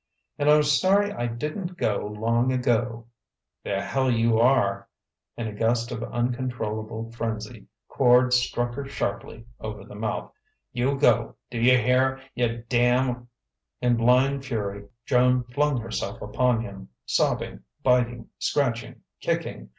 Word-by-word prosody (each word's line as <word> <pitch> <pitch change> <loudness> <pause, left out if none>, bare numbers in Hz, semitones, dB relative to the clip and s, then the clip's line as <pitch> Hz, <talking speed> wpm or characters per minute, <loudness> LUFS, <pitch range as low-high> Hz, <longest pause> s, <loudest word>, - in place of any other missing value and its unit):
"And 145 0 +2
I'm 150 0 +6
sorry 190 +8 +3
I 120 -10 -2
didn't 155 - -4
go 105 -6 0
long 115 +4 0
ago 120 -2 0 0.3
" - - -61
"The 100 -1 -2
hell 130 -1 0
you 115 -1 +2
are!" 100 -6 +2 0.5
In 115 - -3
a 110 - -5
gust 115 +2 0
of 115 -2 -4
uncontrollable 115 -3 -3
frenzy, 115 -1 -5 0.2
Quard 125 -1 +4
struck 120 -1 +1
her 140 +2 -5
sharply 115 -2 -4
over 105 -2 -6
the - - -13
mouth. 110 +2 -3 0.4
"You 130 +3 0
go 145 - +3 0.2
d'you 125 +2 +4
hear? 130 +2 +2
you 120 -1 -1
damn' 125 0 +2 0.3
" 65 +1 -57
In 120 -1 +4
blind 130 +4 +3
fury 100 -6 -4 0.2
Joan 125 0 +3
flung 140 +2 0
herself 110 -3 -4
upon 120 +2 +1
him, 95 -4 -9 0.2
sobbing, - - 0 0.2
biting, 120 -2 +2
scratching, 120 -5 -1 0.2
kicking. - - -3
120 Hz, 135 wpm, -25 LUFS, 115-130 Hz, 0.5 s, I'm